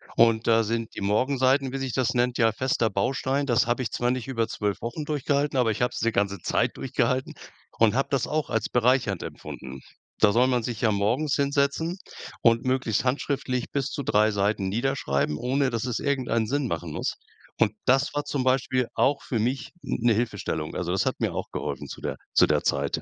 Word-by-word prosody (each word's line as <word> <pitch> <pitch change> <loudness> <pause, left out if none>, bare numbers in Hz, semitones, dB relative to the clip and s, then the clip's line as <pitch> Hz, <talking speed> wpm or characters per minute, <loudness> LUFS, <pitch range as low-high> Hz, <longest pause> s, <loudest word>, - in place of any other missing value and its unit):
und 115 -1 +4
da 115 -1 +5
sind 115 +1 -3
die - - -5
Morgenseiten, 130 +5 +2
wie - - -1
sich 135 -3 -3
das 130 -1 +1
nennt, 125 0 +1
ja 115 -1 +4
fester 120 -2 0
Baustein. 130 +7 0
Das 120 -2 +2
habe 120 +2 0
ich - - -4
zwar 120 0 0
nicht 130 0 -2
über 115 -4 -1
12- 105 -3 -2
Wochen 120 +7 -4
durchgehalten, 145 -1 0
aber 120 -3 +3
ich 105 - -4
habe 125 - +2
es - - -4
die 115 +1 +1
ganze 100 0 0
Zeit - - 0
durchgehalten 130 0 -1 0.4
und 115 -2 +4
habe 135 +2 +1
das 135 -3 +1
auch 155 0 -2
als 110 -3 -1
bereichernd 125 -6 +2
empfunden. 65 0 -8 0.4
Da 105 -2 +5
soll 125 +3 +4
man 125 -3 +1
sich 115 -2 -4
ja 110 -3 +3
morgens 120 +9 +1
hinsetzen 140 +5 0 0.4
und 115 -1 +4
möglichst 130 -4 +1
handschriftlich 130 -1 -1
bis 140 -1 -1
zu 140 - -4
3 110 -2 +3
Seiten 100 -1 0
niederschreiben, 100 - 0
ohne 135 - +1
dass 115 +1 -2
es 125 -3 -2
irgendeinen 125 -5 0
Sinn 140 +2 0
machen 85 -8 -4
muss. - - -3 0.4
Und 110 -2 +3
das 135 +3 +3
war 145 - 0
zum 135 -3 -2
Beispiel 130 -1 +1
auch 140 0 +2
für 120 - -2
mich 130 +5 -1
n - - -2
'ne 120 -1 +4
Hilfestellung. 105 -9 -2
Also, 90 -1 -2
das 95 - +1
hat - - -1
mir - - 0
auch - - -4
geholfen - - -4
zu - - -9
der - - -3 0.2
zu - - +6
der - - +1
Zeit. 70 0 0
125 Hz, 210 wpm, -26 LUFS, 110-135 Hz, 0.4 s, zu